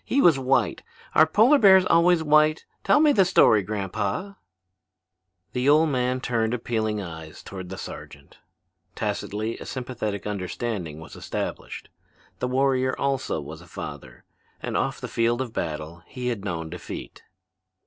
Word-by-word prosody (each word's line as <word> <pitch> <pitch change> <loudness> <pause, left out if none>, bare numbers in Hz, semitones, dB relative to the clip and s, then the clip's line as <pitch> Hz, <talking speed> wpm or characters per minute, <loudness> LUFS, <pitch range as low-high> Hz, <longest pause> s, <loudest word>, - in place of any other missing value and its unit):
He 275 - 0
was 165 - +5
white. 135 +1 +1 0.3
Are 155 - +6
polar 230 - +5
bears 190 -4 +7
always 170 -1 +4
white? 155 +1 +3 0.2
Tell - - +4
me 300 -1 +5
the 200 -8 +5
story, 175 - +5
grandpa." 100 - -3 1.2
The 125 +2 +1
old 155 +2 +5
man 125 -1 0
turned 115 -2 0
appealing 110 -3 -2
eyes 80 -4 -8
toward 95 -3 -8
the 95 - -6
sergeant. 70 -4 -10 0.6
Tacitly 110 +3 -3
a - - -8
sympathetic 115 -6 -4
understanding 95 -4 -4
was 80 - -11
established. - - -5 0.5
The 125 - -1
warrior 130 0 +1
also 135 -10 -1
was 75 +3 -9
a 85 - -15
father, - - -9 0.4
and - - -4
off - - -1
the - - -5
field 115 +1 +1
of 125 -4 -4
battle 80 0 -4
he 125 -1 -4
had 110 -5 -3
known 80 -5 -4
defeat. 90 -1 -8
120 Hz, 150 wpm, -25 LUFS, 95-150 Hz, 1.2 s, bears